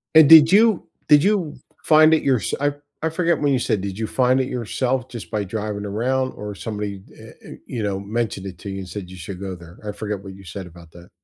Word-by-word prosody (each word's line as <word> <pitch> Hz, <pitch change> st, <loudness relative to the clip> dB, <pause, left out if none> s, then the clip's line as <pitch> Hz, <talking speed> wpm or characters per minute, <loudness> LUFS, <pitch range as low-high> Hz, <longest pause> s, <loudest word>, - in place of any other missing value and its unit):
And 160 Hz, -2 st, +8 dB
did 160 Hz, 0 st, +9 dB
you 215 Hz, -1 st, +4 dB, 0.2 s
did 150 Hz, -1 st, +6 dB
you 190 Hz, -6 st, +1 dB, 0.3 s
find 155 Hz, 0 st, +6 dB
it 160 Hz, -, +2 dB
yourse 130 Hz, -5 st, +1 dB
I 145 Hz, 0 st, +1 dB, 0.3 s
I 160 Hz, -, +1 dB
forget 170 Hz, +1 st, 0 dB
when 145 Hz, -2 st, +2 dB
you 130 Hz, -, +2 dB
said, 105 Hz, -5 st, 0 dB
did 100 Hz, +1 st, -5 dB
you 110 Hz, -, -2 dB
find 130 Hz, +2 st, +2 dB
it 130 Hz, -, -2 dB
yourself 125 Hz, +1 st, -2 dB
just 115 Hz, -9 st, -9 dB
by 105 Hz, -2 st, -2 dB
driving 105 Hz, +1 st, -4 dB
around 130 Hz, +6 st, -1 dB
or 105 Hz, -1 st, -7 dB
somebody 105 Hz, -2 st, -5 dB
eh -, -, -12 dB
eh, -, -, -12 dB, 0.2 s
you 115 Hz, -, -4 dB
know, 100 Hz, -2 st, -1 dB
mentioned 100 Hz, -1 st, -3 dB
it 90 Hz, -2 st, -9 dB
to 100 Hz, -, -7 dB
you 95 Hz, 0 st, -5 dB
and 95 Hz, -, -8 dB
said 95 Hz, -3 st, -7 dB
you 95 Hz, -, -11 dB
should 90 Hz, +2 st, -8 dB
go 95 Hz, -1 st, -5 dB
there, 85 Hz, 0 st, -14 dB
I 105 Hz, -, -3 dB
forgot 105 Hz, -1 st, -5 dB
what 95 Hz, -, -9 dB
you 95 Hz, +1 st, -14 dB
said 95 Hz, 0 st, -8 dB
about 85 Hz, -1 st, -15 dB
that. 85 Hz, +1 st, -15 dB
105 Hz, 245 wpm, -22 LUFS, 95-135 Hz, 0.3 s, did